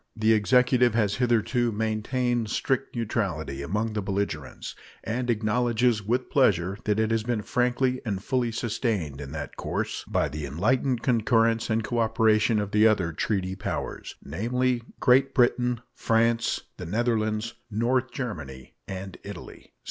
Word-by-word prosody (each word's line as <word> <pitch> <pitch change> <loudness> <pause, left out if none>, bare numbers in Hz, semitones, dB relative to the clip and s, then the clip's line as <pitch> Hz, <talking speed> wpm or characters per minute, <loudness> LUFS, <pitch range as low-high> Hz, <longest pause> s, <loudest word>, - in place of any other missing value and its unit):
The 110 0 +3
Executive 125 +2 +3
has 105 -3 +1
hitherto 120 0 +1
maintained 110 +2 -1
strict 130 +4 -1
neutrality 105 - -2
among 105 +9 -2
the 105 - -1
belligerents, 95 -8 -4 0.3
and 120 +4 -2
acknowledges 120 +1 +2
with 120 +5 -1
pleasure 100 -7 +2
that 105 0 +1
it 110 0 +1
has 115 -1 +2
been 110 -1 -2
frankly 125 +2 +1
and 100 -4 -3
fully 125 -2 0
sustained 105 - -2
in 70 -1 -7
that 75 -2 -6
course - - -3
by - - +1
the 75 -1 -5
enlightened 120 - 0
concurrence 115 -2 +2
and 110 0 +1
cooperation 110 -1 +2
of 105 -1 -3
the 105 +1 +5
other 95 -6 +1
treaty 95 +1 -1
powers, 95 - -5
namely 120 - 0 0.2
Great 130 +2 +4
Britain, 125 -1 +2
France, 115 0 +1 0.2
the 90 - -6
Netherlands, 110 +1 0 0.2
North 120 +4 +1
Germany, 75 - -6
and 95 0 -7
Italy. 100 -4 -10
110 Hz, 140 wpm, -26 LUFS, 100-120 Hz, 0.3 s, the